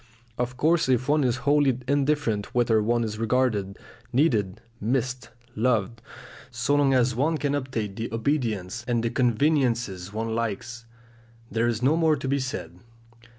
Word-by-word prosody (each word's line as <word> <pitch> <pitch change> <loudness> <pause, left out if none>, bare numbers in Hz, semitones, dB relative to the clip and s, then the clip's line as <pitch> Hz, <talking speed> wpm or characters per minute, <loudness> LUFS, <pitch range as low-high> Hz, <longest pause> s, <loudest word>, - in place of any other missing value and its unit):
Of 125 +1 -3
course 155 0 +2
if 130 0 +2
one 150 0 +3
is 125 -2 +2
wholly 145 -3 +3
indifferent 140 -7 0
whether 115 -3 +3
one 120 +2 +1
is 110 -1 -4
regarded, 110 -5 0 0.3
needed, 110 - +1 0.2
missed, 125 +2 -1 0.3
loved, 115 0 0 0.5
so 145 - -1
long 145 -1 +3
as 125 0 +3
one 150 +7 +1
can 145 -1 -1
obtain 130 -8 -3
the 115 +3 -5
obedience 115 -4 -1
and 120 -2 0
the 115 - 0
conveniences 120 - +1
one 110 +1 -3
likes, 115 +1 -4 0.7
there 115 +1 +1
is 120 0 -1
no 140 +5 +4
more 160 -2 +3
to 140 -2 -5
be 140 +1 +1
said. 130 +1 -5
120 Hz, 150 wpm, -25 LUFS, 115-140 Hz, 0.7 s, no